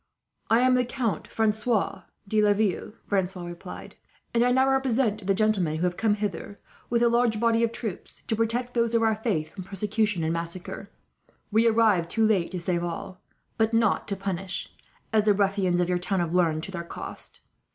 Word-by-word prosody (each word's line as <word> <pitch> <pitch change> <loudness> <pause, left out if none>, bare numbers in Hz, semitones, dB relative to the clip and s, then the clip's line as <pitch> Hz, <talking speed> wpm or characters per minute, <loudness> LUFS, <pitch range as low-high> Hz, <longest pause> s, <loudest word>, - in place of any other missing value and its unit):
"I 225 +2 +5
am 255 0 +4
the 250 0 +3
Count 235 - -2
Francois 220 0 0 0.3
de 215 +1 +2
Laville," 205 -1 +1
Francois 185 -2 -1
replied; 175 0 -9 0.4
"and 235 0 +3
I 245 - +3
now 260 +1 +4
represent 250 -6 +1
the 195 - +3
gentlemen 200 -7 +2
who 160 - -2
have 180 -1 +1
come 215 0 +2
hither, 205 -1 -4 0.3
with 235 0 +2
a - - +5
large 235 -2 +2
body 230 0 +3
of 230 - +1
troops, 220 -5 -7
to 220 - -1
protect 235 +3 -1
those 235 -1 +1
of 230 - +3
our 220 0 +3
faith 210 -8 -2
from 190 - -7
persecution 205 0 -1
and 160 +1 0
massacre. 170 +4 -5 0.6
We 220 +2 +4
arrived 220 -7 +3
too 225 +4 +2
late 200 -6 +2
to 180 - -4
save 170 0 -1
all, 175 +2 -5 0.4
but 225 +1 +2
not 225 -3 +2
to 200 - 0
punish; 195 -1 -4 0.4
as 215 -1 +3
the 210 -2 +4
ruffians 195 -3 +1
of 175 - +2
your 180 0 0
town 190 +1 0
have 170 -1 -1
learned, 165 -3 +2
to 195 - -6
their 170 -3 -4
cost. 170 - -7
210 Hz, 195 wpm, -26 LUFS, 180-225 Hz, 0.6 s, I